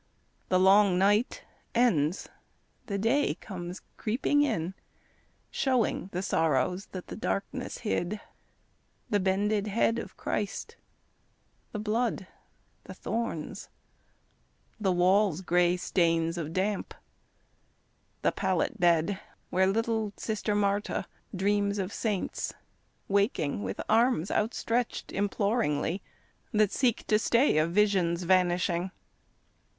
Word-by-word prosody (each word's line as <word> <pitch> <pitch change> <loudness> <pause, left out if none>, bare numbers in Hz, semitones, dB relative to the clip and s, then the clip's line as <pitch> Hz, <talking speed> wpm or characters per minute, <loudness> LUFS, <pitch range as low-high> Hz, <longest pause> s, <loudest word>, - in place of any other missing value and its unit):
The 185 - +4
long 195 0 +5
night 205 +5 +2 0.3
ends, 180 -9 +2 0.6
the 200 -3 -2
day 230 +8 +2
comes 180 -2 -7
creeping 255 +6 +1
in, 200 - 0 0.8
Showing 255 - 0
the 180 +2 -3
sorrows 165 +2 +1
that 185 -2 -7
the - - -7
darkness 225 +4 -3
hid, 210 0 -1 0.9
The 205 - +3
bended 200 +2 +1
head 230 +2 +1
of 195 - -8
Christ, 205 -1 -3 1.0
the - - -4
blood, 215 -1 -1 0.6
the - - -9
thorns, 225 -9 -4 1.1
The 195 -3 +1
wall's 185 0 +3
gray 175 0 +2
stains 165 -2 +1
of 160 -3 -4
damp, 190 +3 -1 1.3
the - - +3
pallet 225 - -1
bed 175 +2 +3 0.3
Where 190 +1 +3
little 220 0 0
Sister 215 -1 -2
Marta 205 0 0 0.3
dreams 200 +1 +1
of 195 0 -3
saints, 210 -5 -2 0.5
Waking 200 - +1
with 95 -1 -4
arms 225 -5 +3
outstretched 230 +2 -1
imploringly 200 -4 0 0.5
That 210 -2 +3
seek 245 -4 +1
to 215 - +3
stay 235 - +3
a 155 - +2
vision's 180 -2 +2
vanishing. 180 0 +2
200 Hz, 105 wpm, -29 LUFS, 180-215 Hz, 1.3 s, long